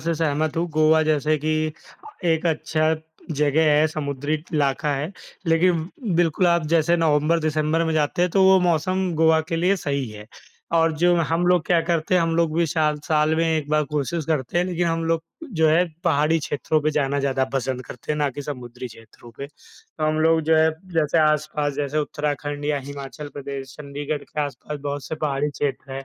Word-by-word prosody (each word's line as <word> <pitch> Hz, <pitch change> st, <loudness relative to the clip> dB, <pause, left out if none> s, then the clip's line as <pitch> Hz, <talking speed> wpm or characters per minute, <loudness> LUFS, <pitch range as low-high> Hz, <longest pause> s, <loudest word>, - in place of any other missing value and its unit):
से 165 Hz, +1 st, -1 dB
सहमत 155 Hz, -1 st, -1 dB
हूँ। 170 Hz, +1 st, +1 dB
गोवा 155 Hz, +1 st, +4 dB
जैसे 155 Hz, 0 st, +1 dB
कि 155 Hz, +2 st, 0 dB, 0.7 s
एक 165 Hz, 0 st, +1 dB
अच्छा 155 Hz, 0 st, +1 dB, 0.4 s
जगह 150 Hz, +1 st, +2 dB
है, 150 Hz, +1 st, +4 dB
समुद्री 145 Hz, -1 st, -3 dB, 0.2 s
इलाका 145 Hz, 0 st, +1 dB
है, 150 Hz, +5 st, -3 dB, 0.4 s
लेकिन 165 Hz, 0 st, +2 dB, 0.3 s
बिल्कुल 175 Hz, +1 st, +2 dB
आप 170 Hz, -2 st, +2 dB
जैसे 165 Hz, +1 st, +3 dB
नवंबर-दिसंबर 155 Hz, 0 st, +1 dB
में 160 Hz, -, -1 dB
जाते 155 Hz, +3 st, +1 dB
हैं 180 Hz, -, +2 dB
तो 195 Hz, +3 st, +3 dB
वो 190 Hz, 0 st, +7 dB
मौसम 180 Hz, +2 st, +1 dB
गोवा 160 Hz, 0 st, +4 dB
के 165 Hz, -, -1 dB
लिए 180 Hz, +4 st, +2 dB
सही 140 Hz, -6 st, -2 dB
है 105 Hz, 0 st, -10 dB, 0.5 s
और 165 Hz, 0 st, +3 dB
जो 175 Hz, 0 st, +5 dB
हम 165 Hz, +1 st, +1 dB
लोग 180 Hz, -2 st, +3 dB
क्या 175 Hz, -2 st, +3 dB
करते 165 Hz, +1 st, 0 dB
हैं, 180 Hz, -, +4 dB
हम 165 Hz, 0 st, 0 dB
लोग 165 Hz, -2 st, +1 dB
भी 170 Hz, -, +3 dB
साल 155 Hz, -1 st, +1 dB
साल 155 Hz, 0 st, +2 dB
में 165 Hz, -, +2 dB
1 160 Hz, -3 st, 0 dB
बार 155 Hz, 0 st, +2 dB
कोशिश 150 Hz, +2 st, -2 dB
करते 155 Hz, 0 st, 0 dB
हैं, 175 Hz, -, +2 dB
लेकिन 175 Hz, -1 st, -1 dB
हम 165 Hz, 0 st, -1 dB
लोग 165 Hz, 0 st, 0 dB, 0.4 s
जो 160 Hz, -, +5 dB
है 165 Hz, +3 st, +4 dB, 0.2 s
पहाड़ी 160 Hz, 0 st, +3 dB
क्षेत्रों 155 Hz, +1 st, -1 dB
पे 155 Hz, -, +2 dB
जाना 140 Hz, -2 st, 0 dB
ज़्यादा 135 Hz, -1 st, +1 dB
पसंद 130 Hz, -1 st, -2 dB
करते 125 Hz, +5 st, -5 dB
हैं -, -, -2 dB
ना 145 Hz, -1 st, +2 dB
कि 145 Hz, +3 st, -7 dB
समुद्री 125 Hz, -3 st, -7 dB
क्षेत्रों 115 Hz, +1 st, -15 dB
पे। 140 Hz, -, -6 dB, 0.5 s
हम 155 Hz, 0 st, +1 dB
लोग 160 Hz, +1 st, +4 dB
जो 160 Hz, -, +5 dB
है 160 Hz, 0 st, +4 dB, 0.2 s
जैसे 160 Hz, 0 st, +2 dB
आस-पास 150 Hz, -1 st, +1 dB
जैसे 145 Hz, +1 st, -2 dB
उत्तराखंड 145 Hz, -1 st, -3 dB
या 145 Hz, -1 st, 0 dB
हिमाचल 140 Hz, +1 st, -7 dB
प्रदेश, 140 Hz, -2 st, -7 dB
चंडीगढ़ 145 Hz, 0 st, -4 dB
के 150 Hz, -, -5 dB
आस-पास 145 Hz, +1 st, -6 dB
बहुत 145 Hz, 0 st, -4 dB
से -, -, -4 dB
पहाड़ी 145 Hz, 0 st, 0 dB
क्षेत्र 140 Hz, -1 st, -4 dB
हैं, 135 Hz, 0 st, -6 dB
155 Hz, 195 wpm, -23 LUFS, 145-165 Hz, 0.7 s, वो